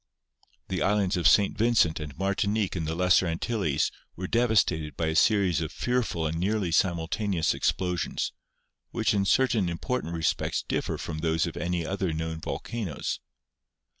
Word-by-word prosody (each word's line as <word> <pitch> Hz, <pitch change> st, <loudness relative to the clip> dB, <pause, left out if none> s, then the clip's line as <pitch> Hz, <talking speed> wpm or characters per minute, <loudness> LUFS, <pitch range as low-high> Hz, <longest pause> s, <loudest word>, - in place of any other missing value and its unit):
The 95 Hz, -, -2 dB
islands 100 Hz, -1 st, +2 dB
of 90 Hz, -, +3 dB
St. 100 Hz, -1 st, +4 dB
Vincent 105 Hz, -8 st, +3 dB
and 75 Hz, -2 st, -7 dB
Martinique 100 Hz, +2 st, 0 dB
in 85 Hz, -3 st, -2 dB
the 80 Hz, +1 st, -2 dB
Lesser 90 Hz, +1 st, +4 dB
Antilles 80 Hz, -, 0 dB, 0.2 s
were 95 Hz, -, -5 dB
devastated 100 Hz, -9 st, +1 dB
by 80 Hz, -, 0 dB
a 80 Hz, -, -2 dB
series 95 Hz, -4 st, +3 dB
of 80 Hz, -1 st, -3 dB
fearful 120 Hz, -10 st, -1 dB
and 80 Hz, +1 st, -2 dB
nearly 100 Hz, -1 st, 0 dB
simultaneous 85 Hz, +1 st, +1 dB
eruptions, 90 Hz, -2 st, -1 dB, 0.6 s
which -, -, 0 dB
in 100 Hz, -1 st, +1 dB
certain 115 Hz, -4 st, +2 dB
important 85 Hz, 0 st, -3 dB
respects 80 Hz, -1 st, 0 dB
differ -, -, -1 dB
from 80 Hz, -2 st, -5 dB
those 80 Hz, 0 st, +1 dB
of -, -, -5 dB
any 85 Hz, +1 st, -2 dB
other 95 Hz, -1 st, -1 dB
known 80 Hz, 0 st, -3 dB
volcanoes. 105 Hz, -7 st, -4 dB
90 Hz, 150 wpm, -27 LUFS, 80-105 Hz, 0.6 s, St